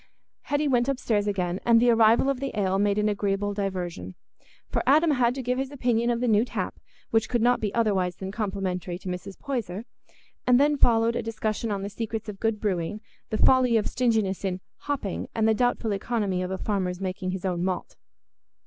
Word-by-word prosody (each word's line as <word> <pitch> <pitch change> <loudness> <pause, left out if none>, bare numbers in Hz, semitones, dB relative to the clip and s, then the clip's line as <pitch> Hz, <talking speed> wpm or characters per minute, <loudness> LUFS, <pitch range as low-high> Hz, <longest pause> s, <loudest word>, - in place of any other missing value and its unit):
Hetty 290 +1 0
went 245 -1 +2
upstairs 220 -6 0
again, 185 -2 -1
and 235 -1 +5
the 240 +1 +5
arrival 230 +2 +5
of 275 -2 0
the 270 -5 -3
ale 190 -1 +1
made 205 0 +2
an 210 0 +2
agreeable 205 0 0
diversion; 180 - -4 0.5
for - - -1
Adam 310 +4 +5
had 245 -3 +2
to 265 - -4
give 250 +1 0
his 270 0 -2
opinion 240 -4 0
of 235 0 0
the 250 - +1
new 215 -1 +4
tap, 245 - -3 0.4
which 225 0 +2
could 240 - +1
not 245 +1 +4
be 210 -2 -1
otherwise 195 -6 +1
than 190 +1 -6
complimentary 190 -4 -3
to 190 - -11
Mrs. 180 +2 -5
Poyser; 230 - -4 0.6
and 250 0 +6
then 295 +1 +4
followed 230 -3 +3
a - - 0
discussion 225 0 -2
on 200 -1 -2
the - - -3
secrets 225 +1 -4
of 205 -2 -7
good 225 -2 0
brewing, 195 -1 -2 0.3
the 215 - -1
folly 255 -2 +5
of 215 - 0
stinginess 220 -7 0
in 185 -1 -1 0.2
"hopping," 275 -10 -3
and 220 -1 +2
the 220 - +4
doubtful 240 -1 0
economy 200 -2 -1
of 180 - -3
a 190 - -2
farmer's 185 -3 -2
making 185 0 -3
his 190 0 -4
own 180 -2 -1
malt. 185 -1 -3
215 Hz, 205 wpm, -26 LUFS, 190-240 Hz, 0.6 s, and